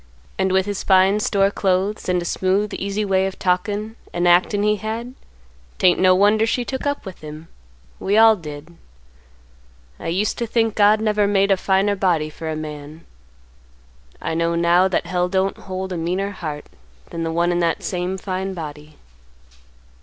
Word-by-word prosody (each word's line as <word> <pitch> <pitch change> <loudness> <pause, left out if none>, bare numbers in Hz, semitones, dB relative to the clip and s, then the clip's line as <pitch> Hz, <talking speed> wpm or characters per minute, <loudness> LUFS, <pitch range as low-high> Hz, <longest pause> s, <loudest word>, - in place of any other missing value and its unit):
and 190 0 +1
with 190 0 +2
his 205 -1 -3
fine 190 +1 +4
store 200 -1 +2
clothes 195 +1 -1
and 180 0 +2
a - - -8
smooth 190 +4 0
easy 200 +2 -2
way 190 -1 +2
of 195 - -7
talkin' 205 +4 -1 0.2
and 175 0 0
actin' 185 +4 +3
he 210 0 +2
had, 225 +4 -5 0.6
'tain't 180 -1 +3
no 185 0 +5
wonder 210 +3 +3
she 245 +1 -1
took 265 +2 -4
up 285 -4 -2
with 190 -2 -9
him. 155 +1 -9 0.5
We 200 +2 +1
all 225 0 +7
did. 155 -1 -10 1.2
I - - -6
used 195 +6 -1
to 235 - -2
think 225 -1 +1
God 210 +1 +4
never 210 -2 +2
made 200 0 +2
a - - +6
finer 195 +2 +1
body 170 -6 0
for 160 +1 -6
a 155 - -2
man. 155 0 -8 1.1
I 165 - -3
know 170 +1 0
now 170 +2 +4
that 185 - -1
Hell 180 0 -1
don't 190 +1 0
hold 190 0 -6
a - - -3
meaner 185 +4 -2
heart 155 -6 -6 0.5
than 165 - -5
the 165 0 -2
one 170 +2 +1
in 175 - 0
that 170 -1 0
same 180 +1 -2
fine 190 0 -4
body. 150 -2 -8
190 Hz, 175 wpm, -21 LUFS, 170-205 Hz, 1.2 s, all